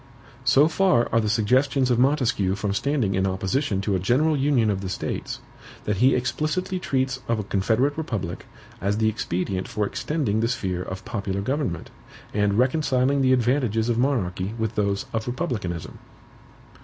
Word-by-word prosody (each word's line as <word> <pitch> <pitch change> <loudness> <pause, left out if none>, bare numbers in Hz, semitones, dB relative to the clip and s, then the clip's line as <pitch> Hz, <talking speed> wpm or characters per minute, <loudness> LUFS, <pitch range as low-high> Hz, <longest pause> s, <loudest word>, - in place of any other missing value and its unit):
So 145 +3 +5
far 170 -7 +3
are 115 - +5
the 105 - -1
suggestions 130 +4 +2
of 120 - +2
Montesquieu 125 -8 +2
from 100 0 -2
standing 125 -3 0
in 95 +1 +1
opposition 95 +3 -1
to 100 +1 -1
a 95 - +1
general 140 - +2
Union 135 -6 +2
of 95 -1 -2
the 95 - -4
States, 90 - -4 0.4
that 105 -1 -1
he 130 +6 +4
explicitly 155 +8 -1
treats 130 -5 -1
of 115 - +1
a 105 - -2
confederate 110 +9 +1
republic 95 - -4 0.3
as 100 +2 0
the 110 0 +3
expedient 95 -3 -2
for 105 -1 -1
extending 125 -3 -1
the 115 - +1
sphere 95 -7 -2
of 95 +1 -6
popular 100 -2 -3
government, 130 - -2 0.4
and 105 -1 +1
reconciling 130 +1 +2
the 130 -1 +3
advantages 120 -3 +2
of 120 -1 +1
monarchy 105 -6 0
with 110 -1 -1
those 100 -2 0
of 110 0 -2
republicanism. 120 - -3
115 Hz, 165 wpm, -24 LUFS, 100-135 Hz, 0.4 s, So